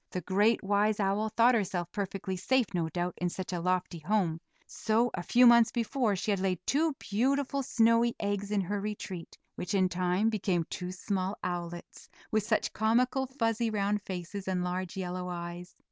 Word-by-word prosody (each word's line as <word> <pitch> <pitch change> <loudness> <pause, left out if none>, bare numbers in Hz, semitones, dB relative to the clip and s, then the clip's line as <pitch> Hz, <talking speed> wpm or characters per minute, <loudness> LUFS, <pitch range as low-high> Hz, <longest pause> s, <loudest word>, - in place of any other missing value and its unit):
The 180 - -4
great, 210 +5 +2
wise 205 +2 +2
owl 205 +2 +1
thought 230 +3 +4
herself 185 -6 -1
perfectly 195 -1 -3
safe, 255 +7 +2
no 165 -2 0
doubt, 175 +2 -2
in 180 - -1
such 185 +1 -5
a 175 - -1
lofty 180 0 -1
home; 170 -1 0 0.2
so, 230 +2 0
a 175 - -3
few 245 +8 +4
months 235 -1 +7
before, 235 -2 0
she 200 +3 -1
had 200 - +1
laid 185 -1 0
two 310 +2 +2
beautiful 275 +4 0
snowy 230 -1 +3
eggs 205 -1 -2
in 210 -1 +1
her 200 +2 -2
retreat, 200 -4 -6 0.2
which 180 +3 -3
in 185 -1 +3
time 180 +4 +1
became 185 -5 0
two 180 0 -4
small 190 +1 -2
owlets, 175 -1 -5 0.2
with 215 - +2
such 215 +1 0
comical, 250 +4 +2
fuzzy, 230 -3 0
round 205 -1 0
faces, 190 +1 -6
and 185 -1 0
large 180 +1 -3
yellow 180 -1 -3
eyes. 175 0 -6
200 Hz, 175 wpm, -30 LUFS, 180-225 Hz, 0.2 s, months